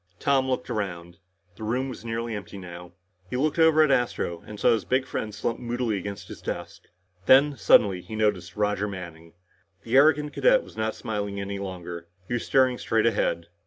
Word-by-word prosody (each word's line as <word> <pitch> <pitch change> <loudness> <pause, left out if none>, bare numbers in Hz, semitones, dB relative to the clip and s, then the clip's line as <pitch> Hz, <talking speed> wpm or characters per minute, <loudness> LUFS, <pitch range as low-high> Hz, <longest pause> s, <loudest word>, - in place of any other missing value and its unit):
Tom 135 +2 +1
looked 125 -1 -2
around. 90 -5 -4 0.4
The - - -8
room 125 +5 -1
was 130 - -8
nearly 115 0 -3
empty 100 -1 -7
now. 90 -1 -10 0.4
He 125 - -2
looked 155 +4 0
over 160 -1 +6
at 150 - +2
Astro 120 -9 0
and 105 -1 -9
saw - - +4
his 115 - +1
big 130 +1 0
friend 110 -4 -4
slumped 105 +3 -3
moodily 120 -1 -1
over 100 - -1
against 100 0 -7
his - - -10
desk. - - -6 0.4
Then, 140 +2 +6
suddenly, 100 -7 +4
he 110 - -8
noticed 100 -4 0
Roger 105 0 0
Manning. 85 -4 -9 0.5
The 115 +2 -2
arrogant 150 +1 +4
cadet - - +4
was - - -15
not 110 0 -2
smiling 105 -3 -4
any 100 0 -4
longer. 90 -3 -7 0.2
He - - -4
was 120 - -1
staring 130 -2 +3
straight 110 -1 +1
ahead. 85 -7 0
110 Hz, 195 wpm, -26 LUFS, 95-125 Hz, 0.5 s, over